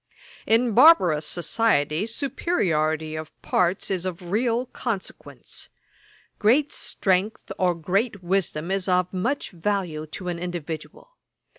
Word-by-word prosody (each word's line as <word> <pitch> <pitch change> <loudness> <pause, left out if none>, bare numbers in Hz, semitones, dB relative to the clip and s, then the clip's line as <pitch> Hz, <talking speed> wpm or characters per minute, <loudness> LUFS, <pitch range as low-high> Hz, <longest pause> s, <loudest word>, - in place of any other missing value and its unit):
'In 230 +2 +3
barbarous 185 - +6
society, 175 -2 +1
superiority 160 - -1
of 155 0 -8
parts 180 +2 0
is 185 -2 -1
of 180 -1 -5
real 235 +3 +1
consequence. 230 -5 -6 0.7
Great 260 +8 +3
strength 190 +3 -1
or 180 -2 +2
great 195 +5 -1
wisdom 175 -2 -1
is 195 -1 0
of 180 0 +1
much 235 +10 -2
value 175 -4 -2
to 180 +4 -8
an 175 -1 -3
individual. 175 - -7
185 Hz, 115 wpm, -24 LUFS, 170-225 Hz, 0.7 s, barbarous